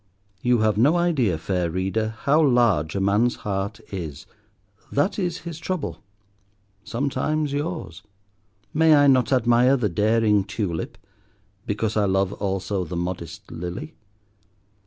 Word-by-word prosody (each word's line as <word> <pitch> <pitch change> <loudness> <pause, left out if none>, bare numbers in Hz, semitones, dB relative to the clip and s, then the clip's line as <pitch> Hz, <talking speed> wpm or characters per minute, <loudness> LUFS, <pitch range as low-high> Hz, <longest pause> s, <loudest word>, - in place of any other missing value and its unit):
You 120 -2 +2
have 110 -1 +2
no 145 +8 +4
idea, 140 - +1
fair 90 +1 -1
Reader, 95 +5 -2
how 150 +3 +3
large 120 - +3
a - - 0
man's 105 +5 +2
heart 100 -1 -2
is: 80 -6 -6 0.7
that 145 +9 +1
is 175 -3 -2
his 165 -1 -7
trouble—sometimes 105 - -4
yours. 145 - -4 0.7
May 160 0 +5
I 145 0 +5
not 130 -3 +4
admire 125 +1 +4
the 110 -5 0
daring 105 +2 +2
tulip, 95 -4 -4 0.7
because 110 +1 -1
I 105 -1 +2
love 95 0 +1
also 95 -1 -2
the 85 +1 -5
modest 85 -2 -5
lily? 95 - -6
105 Hz, 125 wpm, -24 LUFS, 95-135 Hz, 0.7 s, May